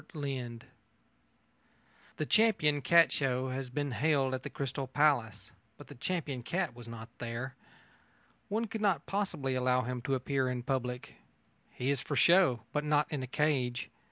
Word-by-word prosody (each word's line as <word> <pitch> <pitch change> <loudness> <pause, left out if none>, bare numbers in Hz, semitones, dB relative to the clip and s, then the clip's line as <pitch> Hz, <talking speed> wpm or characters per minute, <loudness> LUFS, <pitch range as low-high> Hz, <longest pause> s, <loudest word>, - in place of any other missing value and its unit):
V 140 -3 -2
CATS 120 -1 -9 1.5
The 155 - -1
Champion 170 -9 +3
Cat 165 +5 +6
Show 130 -2 0
has 130 0 -4
been 145 +2 -2
held 135 +2 +1
at 130 - -2
the - - -6
Crystal 135 0 -4
Palace, 120 -7 +1 0.3
but 145 - -13
the - - -8
champion 140 -2 -3
cat 175 +10 -2
was 120 -1 -11
not 115 0 -8
there. 120 +3 -4 1.0
One 220 +3 0
could 220 0 -5
not 190 -8 +2
possibly 190 -10 -1
allow 125 0 +2
him 125 +1 -3
to 135 +2 0
appear 130 0 0
in 125 -1 -3
public. 125 -1 -3 0.5
He 130 +3 -2
is 140 -2 0
for - - -3
show, 170 -10 +5
but 150 - 0
not 150 0 +2
in 145 -3 -2
a 130 - -4
cage. 130 -4 0
135 Hz, 165 wpm, -32 LUFS, 125-150 Hz, 1.5 s, Cat